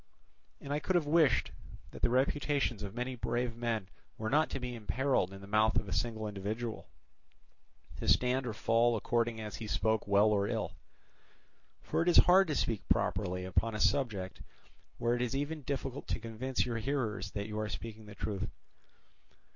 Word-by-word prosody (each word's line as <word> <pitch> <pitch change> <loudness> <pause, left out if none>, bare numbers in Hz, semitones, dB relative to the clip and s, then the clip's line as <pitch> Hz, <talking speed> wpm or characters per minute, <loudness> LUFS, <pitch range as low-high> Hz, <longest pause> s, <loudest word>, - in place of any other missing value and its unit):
And 140 - -4
I 145 - +1
could 185 - -1
have 170 -4 +3
wished 150 -6 +3 0.4
that - - -10
the - - +3
reputations 135 -2 +1
of 100 +1 -6
many 125 +1 -2
brave 120 0 -1
men 115 -4 -2 0.3
were 110 0 -3
not 155 +3 +3
to - - -3
be 125 -1 -4
imperilled 120 -2 0
in 95 0 -10
the - - -9
mouth 110 +2 +3
of 105 - +1
a 95 - -3
single 110 +3 -1
individual, 110 +3 -4 1.1
to - - -5
stand 125 +1 +3
or 115 - -2
fall 115 +1 +3
according 115 +1 0
as 105 -1 -5
he 110 - -6
spoke 110 0 0
well 100 +2 +5
or 100 -1 +2
ill. - - -2 1.1
For - - 0
it 165 - 0
is 175 - +5
hard 190 +1 +7
to 150 - -1
speak 115 -6 0
properly 90 0 0
upon 110 +4 0
a - - -3
subject 105 -9 0 0.6
where 120 +1 +1
it 120 - 0
is 125 +2 -1
even 145 +3 -2
difficult 135 0 -4
to - - -1
convince 115 +3 -2
your 115 -2 -2
hearers 110 -6 -2
that 100 -1 -3
you 105 0 -4
are 110 0 -2
speaking 110 -1 -7
the 105 - -10
truth. 100 -3 -3
115 Hz, 185 wpm, -32 LUFS, 105-130 Hz, 1.1 s, hard